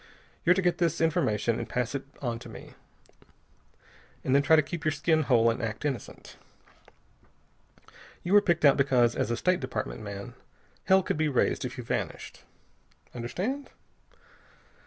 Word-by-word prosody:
You're 180 +2 +5
to 190 - 0
get 175 -1 +1
this 170 -2 +1
formation 135 - +1
and - - -5
pass 125 -1 -2
it 140 - -4 0.2
on 120 -2 -2
to - - -11
me, - - -11 1.5
then 135 +2 +3
try 160 +3 +5
to 155 - +4
keep 160 +2 -6
your 155 - +2
skin 155 +2 +1
whole 115 -5 +3
and 115 - -4
act 110 +4 -4
innocent. 135 -7 -5 1.9
You 175 - -1
were 205 - +8
picked 170 -5 +1
out 140 - +6
because, 125 -4 +3
as - - -1
a 120 - -1
State 185 +5 +1
Department - - -4
man, 100 -1 -7 0.5
hell 190 0 +5
could - - -2
be 155 0 +1
raised 130 - +1
if - - -6
you - - -5
vanished. - - -4 0.7
Understand?" 185 - -4
145 Hz, 155 wpm, -28 LUFS, 120-170 Hz, 1.9 s, were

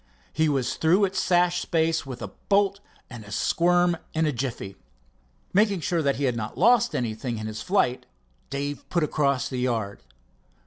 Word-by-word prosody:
He 160 -1 +2
was 130 -3 -1
through 180 +6 +4
its 190 0 -2
sash 175 0 +2
space 160 -2 0
with 125 -3 -7
a 105 - -5 0.2
bolt 200 0 +3 0.3
and 120 -3 -10
a 105 - -13
squirm 175 +7 +2 0.2
in 160 0 +2
a 150 - +1
jiffy. 120 -7 -4 0.8
Making 200 -1 +3
sure 165 +3 0
that 140 -2 +1
he 140 - -4
had 125 -3 +1 0.2
lost 235 +4 +4
nothing 115 0 -3
in 110 - -5
his 110 0 -5
flight, 180 -10 0 0.4
Dave 140 +1 -4
put 170 -3 +1
across 140 -4 +1
the 130 - -4
yard. 115 -5 -2
145 Hz, 170 wpm, -25 LUFS, 125-175 Hz, 0.8 s, through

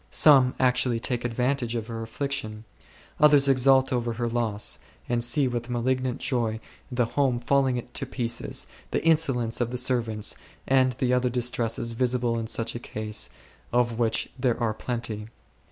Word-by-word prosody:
Some 135 -4 +6
actually 125 -2 +2
take 120 +1 -2
advantage 120 0 -1
of 115 -2 -3
her 115 -1 -6
affliction. 115 -2 -4 0.6
Others 145 -2 +6
exult 135 0 +4
over 120 -1 -1
her 120 +1 -2
loss,, 115 -3 0 0.3
and 120 -1 0
see 135 +3 +3
with 120 -1 -4
malignant 125 +1 -1
joy 120 -5 -1 0.3
the 125 -1 +1
home 130 +1 0
falling 130 0 +1
to 135 +3 -5
pieces, 120 -2 -2 0.2
the - - -2
insolence 135 -8 +2
of 120 - 0
the 125 - -3
servants, 120 -4 0 0.3
and 130 -1 +3
the 125 0 0
other 125 0 +2
distresses 120 -1 0
visible 120 -1 0
in 115 - -4
such 115 +1 -2
a 120 - -5
case, 110 -2 -3 0.4
of 120 -1 +1
which 115 -2 0
there 125 -2 +1
are 115 -3 0
plenty. 110 -2 -5
120 Hz, 155 wpm, -26 LUFS, 115-130 Hz, 0.6 s, Some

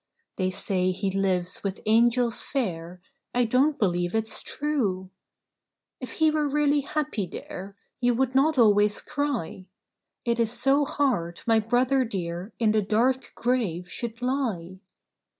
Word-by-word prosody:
They 185 -1 +1
say 185 -1 -1
he 190 +1 -1
lives 185 -2 -1
with 195 -1 -4
angels 235 +2 +3
fair; 180 -9 -4 0.3
I 245 0 +3
don't 270 +6 +2
believe 175 -2 0
it's 220 0 0
true! 210 -12 -2 0.9
"If 255 -3 -6
he 315 -1 +3
were 305 -1 0
really 295 0 +2
happy 280 -8 -2
there, 195 +3 -8 0.2
You 245 -1 +2
would 260 +1 0
not 280 +3 +3
always 210 -3 +4
cry. 245 - -3 0.6
It 235 0 0
is 230 -1 +2
so 275 +3 +3
hard 235 -14 -1
my 225 -1 +4
brother 250 +4 +2
dear 180 -3 -4
In 220 -2 +2
the 215 0 +2
dark 235 +6 +1
grave 195 -9 -1
should 230 +4 -5
lie 215 -9 -2
225 Hz, 140 wpm, -26 LUFS, 190-260 Hz, 0.9 s, always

